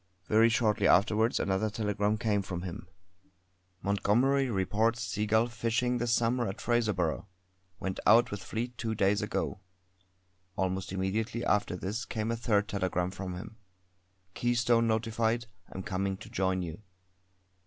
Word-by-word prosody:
Very 110 +4 +5
shortly 110 -2 +2
afterwards 105 +4 +3
another 100 +3 0
telegram 105 -1 0
came 105 -2 +1
from 90 -2 -5
him: 90 0 -7 1.0
"Montgomery 120 +8 +2
reports 110 +3 +1
Seagull 110 +2 +1
fishing 120 +1 0
this 120 0 0
summer 120 0 +2
at 95 - -5
Fraserburgh. 105 -10 0 0.5
Went 95 -1 -3
out 120 +2 +6
with 100 -2 -4
fleet 120 +2 -4
two 110 -1 -2
days 100 0 +2
ago." 105 -1 -2 1.0
Almost 95 0 -2
immediately 110 +5 -2
after 100 -2 +1
this 105 +5 -4
came 110 0 -2
a - - 0
third 105 -3 +1
telegram 90 -2 -1
from 95 -1 -5
him: 105 +5 -9 0.8
"Keystone 120 -1 +2
notified. 115 +1 0 0.3
Am 95 - -6
coming 95 -1 -2
to 110 - -12
join 95 -1 0
you." 85 +3 -7
105 Hz, 135 wpm, -30 LUFS, 95-115 Hz, 1.0 s, out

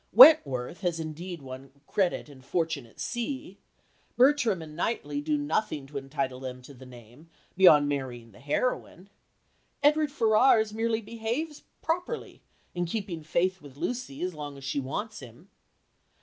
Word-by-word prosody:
Wentworth 140 - +7
has 175 -3 -1
indeed 160 +1 -6
won 130 +1 -9
credit 185 -2 0
and 135 -3 -15
fortune 160 -3 -1
at 115 - -22
sea. 265 +6 -4 0.6
Bertram 250 -7 +4
and 155 -1 -11
Knightley 235 - -2
do 300 0 0
nothing 215 - -1
to 140 +1 -5
entitle 135 -2 -3
them 130 -1 -7
to 140 - -12
the 130 0 -13
name, 125 +6 -15 0.3
beyond 155 -6 +7
marrying 125 -5 -4
the 100 - -17
heroine. 190 - -2 0.7
Edward 300 0 +4
Ferrars 220 -3 +4
merely 225 0 0
behaves 230 +8 -4 0.2
properly 355 +8 -3 0.3
in 175 0 -1
keeping 190 -4 -4
faith 180 +4 0
with 140 -2 -13
Lucy 235 - -4
as 180 0 -2
long 145 -2 -7
as 135 - -12
she 140 +1 -1
wants 205 +12 -4
him. 120 -3 -13
170 Hz, 150 wpm, -28 LUFS, 135-230 Hz, 0.7 s, Wentworth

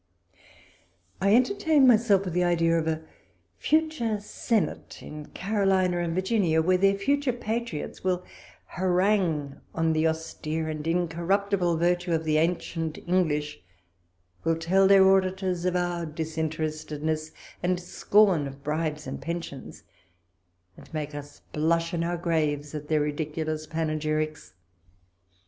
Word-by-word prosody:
I 200 +2 +5
entertain 310 0 +3
myself 215 -5 +4
with 180 - -3
the 180 +1 +2
idea 165 -1 +2
of 160 - -3
a 160 0 -1 0.6
future 310 -9 +1
senate 205 -2 -2
in 150 0 -8
Carolina 190 -3 +1
and 170 -1 -2
Virginia, 185 -4 +2
where 180 +3 +3
their 195 +1 +4
future 280 +6 +1
patriots 235 -7 -4
will 180 -1 0 0.4
harangue 180 -6 0
on 165 0 +2
the 155 +1 +2
austere 160 0 -3
and 155 0 -4
in 175 +1 +1
corruptible 180 +1 0
virtue 175 +1 +1
of 160 0 0
the 155 -1 +1
ancient 165 -1 -1
English 150 -5 0 0.8
I - - 0
will 165 - +2
tell 190 +4 +3
their 195 -1 +7
auditors 185 -2 +1
of 180 0 +1
our 175 -1 -1
disinterestedness 155 0 -3 0.3
and 180 0 0
scorn 180 -3 +3
of 135 0 -11
bribes 150 0 -2
and - - -6
pensions, 165 -5 -6 0.9
and - - -16
make 150 -1 -3
us 145 0 -9
blush 165 +2 +1
in 165 -1 0
our 175 +1 -1
graves 155 -4 -1
at 150 -1 -6
their 155 -1 +2
ridiculous 155 +1 -3
panegyrics. 155 - -2
170 Hz, 130 wpm, -27 LUFS, 155-190 Hz, 0.9 s, their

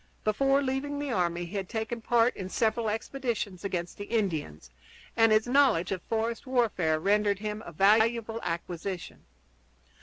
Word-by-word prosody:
Before 270 +6 +2
leaving 270 +2 -2
the 285 -2 -3
army 175 -4 0
he 175 +5 -9
had 190 -2 -4
taken 225 +1 -3
part 235 +1 +3
in 185 -1 -6
several 220 +2 0
expeditions 225 -4 -3
against 180 -2 -4
the 205 - -4
Indians, 170 - -2 0.4
and 225 -1 +5
his 215 0 +4
knowledge 245 -9 +3
of 185 -2 -2
forest 225 +4 -2
warfare 205 -11 +1
rendered 205 +2 +2
him 210 +1 -4
a - - -7
valuable 220 +5 +3
acquisition. 175 +2 -5
215 Hz, 150 wpm, -28 LUFS, 185-235 Hz, 0.4 s, and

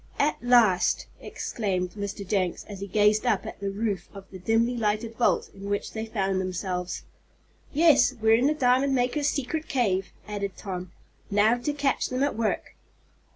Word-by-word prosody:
"At 295 +2 +2
last!" 235 -7 +4
exclaimed 185 -5 -3
Mr. 200 -1 -5
Jenks, 185 -3 0
as 200 -2 -9
he 200 - -5
gazed 210 +2 +3
up 215 -6 +1
at - - -7
the 200 0 -2
roof 200 -2 -2
of 195 -1 -9
the 190 - -9
dimly 225 +6 +1
lighted 225 0 -1
vault 235 - +1
in 200 +1 -8
which 205 0 -2
they 220 0 -4
found 195 -3 0
themselves. 180 -1 -3 0.7
"Yes, 305 -2 +5
we're 220 0 +4
in 245 +4 +4
the 305 - +2
diamond 265 0 +3
makers' 260 +4 +1
secret 305 +3 -3
cave," 195 -8 +1 0.2
added 200 -2 -4
Tom. 185 -3 -6 0.4
"Now 210 +3 +4
to 295 +5 -1
catch 285 -2 0
them 255 +2 0
at 285 - 0
work!" 220 -1 -2
215 Hz, 170 wpm, -26 LUFS, 195-245 Hz, 0.7 s, Yes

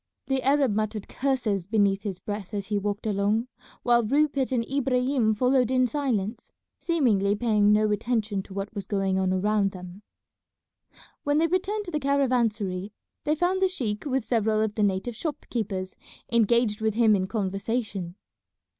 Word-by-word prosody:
The 270 -1 0
Arab 275 -3 +3
muttered 215 -1 -2
curses 240 -9 -1
beneath 200 -2 +2
his 200 -4 -4
breath 205 +1 -6
as 200 0 -4
he 205 -1 +1
walked 205 +1 -3
along, 210 +3 0 0.3
while 240 -1 +4
Rupert 275 +2 +1
and 235 -3 0
Ibrahim 255 -4 +1
followed 250 +1 +2
in 255 -1 +3
silence, 240 -6 -2 0.3
seemingly 215 - +2
paying 210 -2 +3
no 210 0 +3
attention 210 -2 -1
to 190 - -13
what 200 +2 -4
was 200 -3 -6
going 195 -2 0
on 190 -1 +1
around 200 +1 +1
them. 180 +1 -10 1.2
When 290 0 +1
they 320 - +4
returned 390 +5 -1
to 350 - -7
the 305 - -1
caravansary 230 -9 0 0.3
they 300 - +2
found 360 +4 0
the 380 - +5
sheik 230 - -3
with 265 -4 -1
several 220 -2 +1
of 215 -1 0
the 215 - -2
native 205 +3 0
shop 295 +5 -4
keepers 190 -5 -3 0.4
engaged 235 -1 +2
with 220 -1 0
him 225 -2 +5
in 190 -1 -1
conversation. 195 -2 -3
220 Hz, 165 wpm, -26 LUFS, 200-255 Hz, 1.2 s, the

